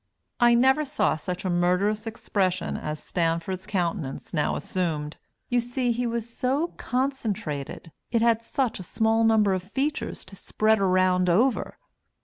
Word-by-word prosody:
I 240 Hz, -1 st, +6 dB
never 265 Hz, +5 st, +4 dB
saw 285 Hz, -, +1 dB
such 180 Hz, +4 st, -5 dB
a -, -, +1 dB
murderous 185 Hz, +5 st, +1 dB
expression 190 Hz, -5 st, -1 dB
as 150 Hz, 0 st, -5 dB
Stanford's 170 Hz, +3 st, -1 dB
countenance 175 Hz, -8 st, -3 dB
now 150 Hz, -3 st, +1 dB
assumed; 155 Hz, -5 st, -3 dB, 0.3 s
you 245 Hz, -, +2 dB
see 245 Hz, +1 st, -1 dB
it 245 Hz, -, 0 dB
was 235 Hz, -1 st, -2 dB
so 265 Hz, +7 st, -1 dB
concentrated 215 Hz, -, -3 dB, 0.2 s
it 230 Hz, -1 st, +1 dB
had 230 Hz, -1 st, +3 dB
such 245 Hz, -1 st, -1 dB
a 180 Hz, -, -7 dB
small 225 Hz, 0 st, +2 dB
number 220 Hz, -3 st, +4 dB
of 185 Hz, -, -1 dB
features 265 Hz, +11 st, -3 dB
to 195 Hz, -, -11 dB
spread 215 Hz, +3 st, +1 dB
around 185 Hz, -1 st, +3 dB
over. 235 Hz, +9 st, +2 dB
210 Hz, 145 wpm, -26 LUFS, 180-240 Hz, 0.3 s, I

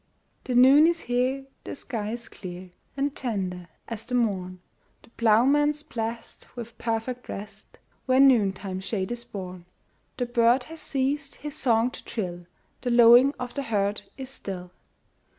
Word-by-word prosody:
The 250 Hz, -, -2 dB
noon 270 Hz, +5 st, +8 dB
is 340 Hz, -1 st, +1 dB
here, 255 Hz, +3 st, 0 dB, 0.2 s
the -, -, -6 dB
sky 225 Hz, -7 st, -4 dB
is 235 Hz, 0 st, -6 dB
clear 180 Hz, -1 st, -9 dB, 0.3 s
And 280 Hz, +1 st, -1 dB
tender 185 Hz, -8 st, -3 dB, 0.2 s
as 225 Hz, -2 st, -5 dB
the 250 Hz, +2 st, -3 dB
morn; 185 Hz, -6 st, -1 dB, 0.4 s
The -, -, -20 dB
ploughman's 280 Hz, +7 st, +3 dB
blest 230 Hz, -5 st, -5 dB
with 235 Hz, -2 st, -8 dB
perfect 235 Hz, +2 st, -3 dB
rest, 205 Hz, +2 st, -8 dB, 0.3 s
Where 260 Hz, 0 st, +4 dB
noontime 200 Hz, -8 st, +3 dB
shade 190 Hz, +2 st, -3 dB
is 240 Hz, 0 st, -4 dB
born. 185 Hz, -3 st, -8 dB, 0.5 s
The 245 Hz, -, 0 dB
bird 240 Hz, +1 st, +3 dB
has 320 Hz, +3 st, -10 dB
ceased 275 Hz, +1 st, -1 dB
his 295 Hz, -1 st, -7 dB
song 235 Hz, -1 st, +2 dB
to -, -, -10 dB
trill; 175 Hz, -5 st, -5 dB, 0.3 s
The 250 Hz, -, -2 dB
lowing 240 Hz, +3 st, +7 dB
of 245 Hz, -1 st, -5 dB
the 280 Hz, -, -2 dB
herd 205 Hz, -4 st, -1 dB, 0.2 s
is 265 Hz, -1 st, -6 dB
still. 180 Hz, -7 st, -6 dB
235 Hz, 150 wpm, -26 LUFS, 205-265 Hz, 0.5 s, noon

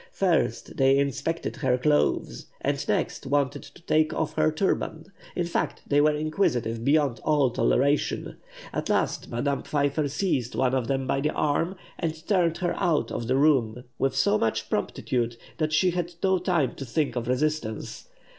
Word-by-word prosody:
First -, -, 0 dB
they 135 Hz, 0 st, +4 dB
inspected 140 Hz, +4 st, -1 dB
her 130 Hz, -3 st, +1 dB
clothes, 145 Hz, +3 st, +1 dB
and -, -, -2 dB
next -, -, -1 dB
wanted 140 Hz, 0 st, 0 dB
to 175 Hz, -, -15 dB
take 155 Hz, -1 st, +2 dB
off 160 Hz, -, -1 dB
her 155 Hz, 0 st, +2 dB
turban; 190 Hz, +3 st, -2 dB, 0.2 s
in 175 Hz, -, 0 dB
fact, 170 Hz, -, -2 dB
they 145 Hz, 0 st, +3 dB
were 150 Hz, 0 st, +3 dB
inquisitive 135 Hz, -, 0 dB
beyond 140 Hz, -2 st, +2 dB
all 145 Hz, -5 st, +3 dB
toleration. 140 Hz, +5 st, +1 dB, 0.4 s
At -, -, -3 dB
last, -, -, 0 dB
Madame 140 Hz, +4 st, -1 dB
Pfeiffer 145 Hz, 0 st, 0 dB
seized 140 Hz, -, -1 dB
one 130 Hz, -1 st, +1 dB
of 130 Hz, -3 st, 0 dB
them 135 Hz, 0 st, 0 dB
by 135 Hz, +1 st, 0 dB
the 150 Hz, -, +1 dB
arm, 165 Hz, +5 st, 0 dB, 0.2 s
and 160 Hz, -1 st, -4 dB
turned 175 Hz, -5 st, +2 dB
her 175 Hz, -, -1 dB
out 170 Hz, -6 st, +1 dB
of 120 Hz, 0 st, -4 dB
her 130 Hz, -, +3 dB
room 130 Hz, -5 st, +2 dB, 0.2 s
with 135 Hz, -1 st, +1 dB
so 135 Hz, -5 st, +3 dB
much 115 Hz, -, -1 dB
promptitude 120 Hz, -2 st, -1 dB, 0.2 s
that 155 Hz, -1 st, 0 dB
she 180 Hz, +4 st, +3 dB
had 175 Hz, 0 st, -3 dB
no 190 Hz, -1 st, +3 dB
time 175 Hz, -6 st, +1 dB
to 135 Hz, -, -5 dB
think 145 Hz, +4 st, -1 dB
of 120 Hz, -1 st, -3 dB
resistance. 130 Hz, -4 st, -2 dB
145 Hz, 170 wpm, -26 LUFS, 130-160 Hz, 0.4 s, they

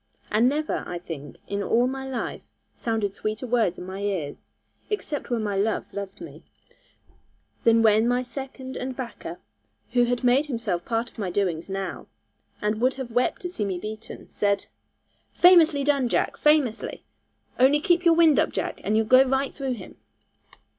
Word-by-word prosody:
And 225 Hz, +4 st, +4 dB
never, 305 Hz, +2 st, -1 dB
I 175 Hz, -, -4 dB
think, 155 Hz, -5 st, -8 dB
in 200 Hz, 0 st, -2 dB
all 235 Hz, +4 st, +2 dB
my 265 Hz, +1 st, -3 dB
life, 255 Hz, -, -4 dB, 0.3 s
sounded 220 Hz, -4 st, -1 dB
sweeter 215 Hz, +4 st, -4 dB
words 230 Hz, -7 st, +1 dB
in -, -, -7 dB
my 190 Hz, +1 st, -6 dB
ears 190 Hz, -8 st, -3 dB, 0.4 s
(except 410 Hz, -8 st, -3 dB
when 235 Hz, -3 st, 0 dB
my 205 Hz, -2 st, -1 dB
love 205 Hz, +3 st, 0 dB
loved 200 Hz, -1 st, -6 dB
me) 335 Hz, -, -10 dB, 1.2 s
than 230 Hz, 0 st, +5 dB
when 220 Hz, +1 st, +5 dB
my 245 Hz, +1 st, +1 dB
second 260 Hz, +1 st, -7 dB
and 255 Hz, 0 st, -4 dB
backer, 225 Hz, -9 st, -7 dB, 0.5 s
who 245 Hz, -1 st, +4 dB
had 245 Hz, +1 st, -1 dB
made 255 Hz, +4 st, +3 dB
himself 220 Hz, -10 st, -2 dB
part 230 Hz, 0 st, -1 dB
of -, -, -15 dB
my 195 Hz, -3 st, -2 dB
doings 175 Hz, -2 st, -1 dB
now, 195 Hz, -1 st, -4 dB, 0.6 s
and 210 Hz, +1 st, 0 dB
would 255 Hz, +2 st, +2 dB
have 260 Hz, -3 st, -6 dB
wept 245 Hz, +8 st, 0 dB
to 360 Hz, -, -2 dB
see 245 Hz, -12 st, -3 dB
me 195 Hz, -3 st, -2 dB
beaten, 215 Hz, +4 st, -8 dB
said, 200 Hz, -1 st, 0 dB, 0.7 s
'Famously 330 Hz, -5 st, +6 dB
done, 275 Hz, -3 st, +2 dB
Jack, -, -, 0 dB
famously! 300 Hz, -7 st, +1 dB, 0.6 s
Only 270 Hz, +4 st, +5 dB
keep 350 Hz, +2 st, +2 dB
your 335 Hz, -1 st, +5 dB
wind 325 Hz, -3 st, +5 dB
up, -, -, +2 dB
Jack, -, -, -3 dB
and 215 Hz, -, +1 dB
you'll 220 Hz, -, +2 dB
go 255 Hz, +4 st, +7 dB
right 270 Hz, +1 st, 0 dB
through 270 Hz, -2 st, -3 dB
him!' 240 Hz, -, -10 dB
235 Hz, 175 wpm, -25 LUFS, 205-265 Hz, 1.2 s, go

